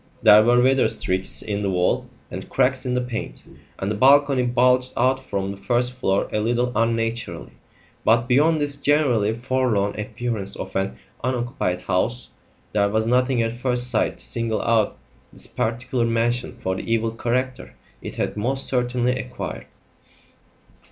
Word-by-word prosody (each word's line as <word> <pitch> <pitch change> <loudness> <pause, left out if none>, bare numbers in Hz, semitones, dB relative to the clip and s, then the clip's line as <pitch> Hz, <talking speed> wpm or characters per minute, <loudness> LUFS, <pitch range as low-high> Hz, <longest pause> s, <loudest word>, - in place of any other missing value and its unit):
There 105 +1 +8
were 120 +2 +4
weather 130 +1 +3
streaks 95 +1 +1
in 105 -1 -3
the 100 - -1
wall 90 -1 0 0.2
and - - -7
cracks 130 0 +1
in 125 - 0
the 125 - +1
paint, 125 -2 -6 0.3
and 95 +2 -3
the - - 0
balcony 135 +3 +4
bulged 125 +1 +2
out 130 +1 +2
from 100 -4 -3
the 100 - -8
first 125 +4 0
floor 100 -6 0
a 105 - +1
little 120 +3 0
unnaturally. 115 +1 -1 0.5
But, 115 +1 +3
beyond 150 +5 +3
this 145 -1 -1
generally 135 -8 +2
forlorn 120 -5 0
appearance 105 -2 -3
of - - -7
an 95 0 -1 0.3
unoccupied 120 -7 -2
house, 100 +7 -1 0.4
there 100 -1 +2
was 110 +1 0
nothing 125 0 +2
at 115 0 -2
first 125 0 +2
sight 110 - 0
to - - -2
single 115 -2 -1
out 115 -2 +1 0.3
this - - -6
particular 120 +1 -2
mansion 115 +1 -1
for 95 0 -1
the 115 - -5
evil 115 0 +1
character 125 +3 -3 0.3
it - - -7
had - - -2
most 130 +6 -2
certainly 125 0 0
acquired. 125 0 -6
120 Hz, 160 wpm, -22 LUFS, 110-125 Hz, 0.5 s, There